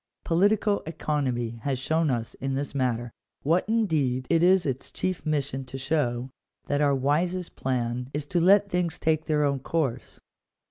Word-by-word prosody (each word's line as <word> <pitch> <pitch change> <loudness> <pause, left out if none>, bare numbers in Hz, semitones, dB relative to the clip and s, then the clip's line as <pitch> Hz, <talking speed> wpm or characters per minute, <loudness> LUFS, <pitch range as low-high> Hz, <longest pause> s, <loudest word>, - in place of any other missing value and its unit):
Political 205 +4 +2
economy 130 -7 -2
has 135 +1 -1
shown 160 +4 +1
us 120 -3 -2
in 135 +1 -3
this 140 0 -3
matter 120 -3 -1 0.2
— - - -48
what 170 +7 +2
indeed 155 - +1
it 165 -1 +4
is 185 0 +5
its 135 -2 -3
chief 185 -2 -3
mission 140 -3 -1
to 130 +1 -7
show 130 -3 -1 0.2
— - - -54
that 145 +1 +1
our 140 -1 +3
wisest 165 +7 0
plan 125 -1 -2
is 145 0 -3
to 170 +3 0
let 200 +3 +5
things 180 -3 -1
take 160 -1 +1
their 150 -2 +1
own 140 -1 +1
course. 135 -3 -2
145 Hz, 175 wpm, -26 LUFS, 130-165 Hz, 0.2 s, is